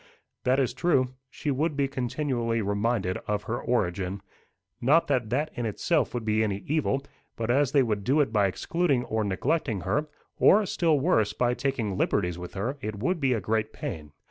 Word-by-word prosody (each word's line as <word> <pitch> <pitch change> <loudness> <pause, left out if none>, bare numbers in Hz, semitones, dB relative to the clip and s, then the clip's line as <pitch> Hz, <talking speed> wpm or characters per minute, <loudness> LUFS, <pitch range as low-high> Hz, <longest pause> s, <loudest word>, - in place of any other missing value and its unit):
"That 130 +1 +3
is 130 -3 +1
true. 130 -7 +1 0.2
She 145 +2 -3
would 150 +2 0
be 140 -1 +2
continually 125 -3 -1
reminded 100 -1 0
of 105 0 -1
her 120 +2 -3
origin. 95 -4 -1 0.6
Not 150 +7 +4
that 125 -6 +1
that 145 +6 0
in 120 -2 -2
itself 150 - 0
would 120 -2 -3
be 110 0 +2
any 100 -2 -2
evil; 140 -2 0 0.3
but 115 0 -1
as 140 +1 +3
they 140 -2 +4
would 105 -4 -1
do 135 +8 +2
it 135 -6 +1
by 105 -2 +4
excluding 140 - 0
or 110 0 -1
neglecting 105 - -1
her, 150 - 0 0.3
or, 210 +1 +6
still 165 -5 +2
worse, 110 - +2
by 125 0 +1
taking 120 -8 -2
liberties 90 -3 0
with 90 +2 -8
her, 120 +9 -3
it 110 0 -4
would 165 - 0
be 135 -3 +2
a 115 - 0
great 110 +2 -1
pain. 75 -2 -6
120 Hz, 190 wpm, -27 LUFS, 105-140 Hz, 0.6 s, or